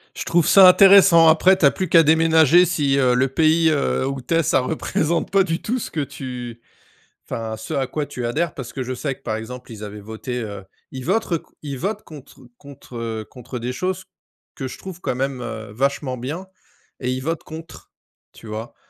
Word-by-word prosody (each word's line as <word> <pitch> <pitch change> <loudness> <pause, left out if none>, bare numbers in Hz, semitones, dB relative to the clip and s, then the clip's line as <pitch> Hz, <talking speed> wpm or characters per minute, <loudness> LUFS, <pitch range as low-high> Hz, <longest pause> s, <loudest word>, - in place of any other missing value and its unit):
Je - - -4
trouve 170 -2 +2
ça 190 -2 +8
intéressant, 185 -3 +7
après 180 +4 +5
tu 170 - +2
as 140 - +6
plus 185 -2 -4
qu'à 165 - +7
déménager 160 +1 +5
si, 145 -6 0
heu, 125 -2 +3
le 130 +2 +2
pays, 160 +4 +3
heu, 140 -3 0
où 135 -1 -4
tu 125 - -3
es 165 - +3
ça 135 - +2
représente 160 +4 -1
pas 195 -1 +3
du 165 -2 -3
tout 245 +4 -2
ce 245 - -6
que 160 - -3
tu 125 -4 -6 0.6
enfin 110 -1 -5
ce 110 - -7
à 135 -2 -1
quoi 150 +3 -3
tu 135 -3 -7
adhères, 150 +7 -1
parce 120 -3 -8
que 130 - -4
je 130 +1 -4
sais 135 +2 -3
que 135 - -30
par 110 - -2
exemple, 125 +3 -8
ils 110 -2 -9
avaient 105 0 -8
voté, 110 +4 -6
heu, 100 -2 -7 0.3
ils 130 -1 -7
votent 195 +1 0
c - - -14 0.2
ils 140 -3 -5
votent 205 +6 -3
contre 150 -5 -14 0.2
contre, 140 -3 -12
heu, 110 -2 -4
contre 125 0 -9
des 120 +1 -4
choses 185 +7 -3 0.5
que 135 - -5
je - - -9
trouve 185 -2 -10
quand - - -2
même, 135 0 -3
heu, 110 -3 -7
vachement 130 +2 -1
bien 155 +10 -6 0.5
et 125 0 -2
ils 130 0 -3
votent 165 +4 -3
contre. 160 +1 -11 0.4
Tu - - -16
vois? 110 +2 -7
140 Hz, 215 wpm, -21 LUFS, 125-165 Hz, 0.6 s, ça